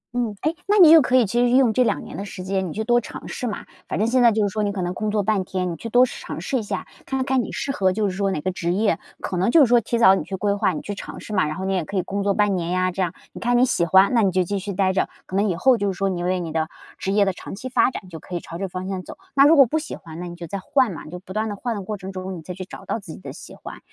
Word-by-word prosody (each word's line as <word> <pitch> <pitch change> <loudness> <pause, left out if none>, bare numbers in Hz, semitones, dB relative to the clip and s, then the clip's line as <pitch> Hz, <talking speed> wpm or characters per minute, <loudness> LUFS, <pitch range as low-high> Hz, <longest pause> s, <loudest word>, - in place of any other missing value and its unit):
嗯。 235 -4 -1
哎， 310 +2 +1
那 415 - +3
你 350 -6 +9
也 325 - +10
可 255 -1 +1
以 250 -3 +5
其 235 +4 -1
实 245 - +3
是 245 - +3
用 255 -4 +4
这 255 - +3
2 235 - 0
年 - - -9
的 195 - -4
时 185 -2 -8
间 190 0 -1
你 155 - -6
去 220 - -2
多 240 +2 +3
尝 - - -9
试 250 - -4
嘛， 215 - -5 0.2
反 - - -3
正 215 - +1
现 250 +2 +3
在 235 -1 +6
就 215 0 +1
是 205 - +1
说 215 +2 -2
你 205 - 0
可 195 -2 -4
能 175 0 -2
工 215 +3 -2
作 210 -1 0
半 205 -1 +1
天， 180 -1 -2
你 - - -4
去 230 - -7
多 245 +3 +6
试 - - -8
尝 - - -6
试 265 - -1
一 - - -1
下， 205 - -4 0.2
看 265 -1 -1
看 265 -1 +2
你 - - -6
适 275 - -3
合 190 -7 +1
就 210 0 0
是 185 - -5
说 200 -1 +1
哪 170 - -2
个 185 - -1
职 175 -1 -2
业。 205 -3 +1 0.2
可 185 - -3
能 190 +6 +2
就 325 - +7
是 - - +8
说 240 0 +5
提 235 +2 -2
早 210 -5 +7
你 - - -2
去 195 - -5
规 200 +1 0
划、 205 - +1
你 - - -4
去 205 - -5
尝 - - -8
试 215 - -8
嘛， 185 -5 +2
然 155 - -3
后 190 - -4
你 195 - 0
也 185 -3 0
可 200 - -4
以 - - +3
工 200 +1 -3
作 200 0 +2
半 205 -1 +2
年 170 -2 -2
呀 185 0 +1
这 190 - -3
样， 175 -2 -1 0.2
你 - - -10
看 245 +1 +2
你 250 - +5
喜 170 -8 +1
欢， 190 +7 +5
那 235 - +4
你 195 -3 +3
就 185 +1 +2
继 200 +3 -2
续 200 +1 -5
待 190 0 +2
着， 185 - +1 0.2
可 185 - -7
能 205 +2 +2
以 175 - 0
后 250 +8 +4
就 200 -2 0
是 185 - -8
说 195 +1 0
你 175 -2 -3
为 180 +1 0
你 170 -2 -4
的 160 0 -1 0.3
职 190 - -2
业 205 0 +4
的 195 - +1
长 180 - -8
期 255 +6 -7
发 255 0 +3
展， 215 - -8
就 165 -2 -8
可 180 - -8
以 - - -1
朝 170 - -9
这 195 +2 -3
方 185 +1 -6
向 190 -1 -3
走。 - - -10 0.2
那 275 0 +7
如 320 - +6
果 275 -3 +8
不 310 +7 -1
喜 310 - -6
欢， 165 -2 -11
那 180 - -5
你 175 - -8
就 175 0 -8
再 200 +5 -4
换 255 +4 +1
嘛， 165 - -8
就 175 +3 -7
不 185 +1 -11
断 215 +1 -1
地 205 - -4
换 235 +3 -3
的 205 - -4
过 210 +2 -5
程 190 0 -7
中， 185 0 -5
你 - - -9
再 180 +3 -7
去 185 +1 -7
找 - - -11
到 - - -2
自 190 -6 -10
己 - - -11
的 - - -8
喜 - - -11
欢。 - - -10
200 Hz, 385 characters per minute, -23 LUFS, 185-235 Hz, 0.3 s, 也